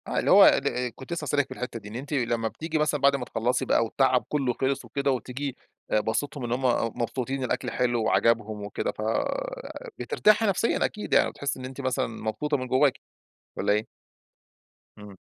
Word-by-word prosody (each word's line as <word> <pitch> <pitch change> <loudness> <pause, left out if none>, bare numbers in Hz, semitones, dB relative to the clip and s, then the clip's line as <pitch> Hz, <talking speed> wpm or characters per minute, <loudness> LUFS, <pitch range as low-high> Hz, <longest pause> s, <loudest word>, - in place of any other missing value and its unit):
آه، - - 0
اللي - - +1
هو - - +9
ال 125 -2 +2
كنت 130 +5 -7
لسه 165 - -3
هاسألِك 145 -1 +1
في - - -7
الحِتّة 125 -2 -5
دي، 105 - -11
إن 105 - -9
أنتِ 140 +5 -5
لما 120 -4 0
بتيجي 160 +7 -3
مثلًا 150 -2 +1
بَعد 140 0 +5
ما 130 -3 -3
تخلّصي 125 +2 0
بقى - - +3
و - - -2
التعب 130 +1 +2
كلّه 135 -4 0
خلِص 130 +1 -1
وكده 140 +4 0
وتيجي 130 +2 -3 0.4
أ 110 - +4
باسِطهم 115 +6 -2
إن 120 - -3
هُم 125 -2 +1
مبسوطين، 130 +3 -2
الأكل 125 - -2
حلو 120 -2 +1
وعجَبهم 110 -2 +1
وكده، 100 - -2
ف - - -9 1.0
بترتاحي 215 +1 +3
نفسيًا 205 +3 +1
أكيد، 210 - -4
يعني - - +5
بتحسّي 140 -2 -4
إن 130 - -6
أنتِ 135 +1 -7
مثلًا 130 -2 0
مبسوطة 115 +6 -2
من 130 -1 -4
جواكِ 130 +2 +3 0.6
والّا - - +2
إيه؟ 105 +1 -1 1.1
امم. 105 -2 -11
130 Hz, 190 wpm, -26 LUFS, 115-140 Hz, 1.1 s, هو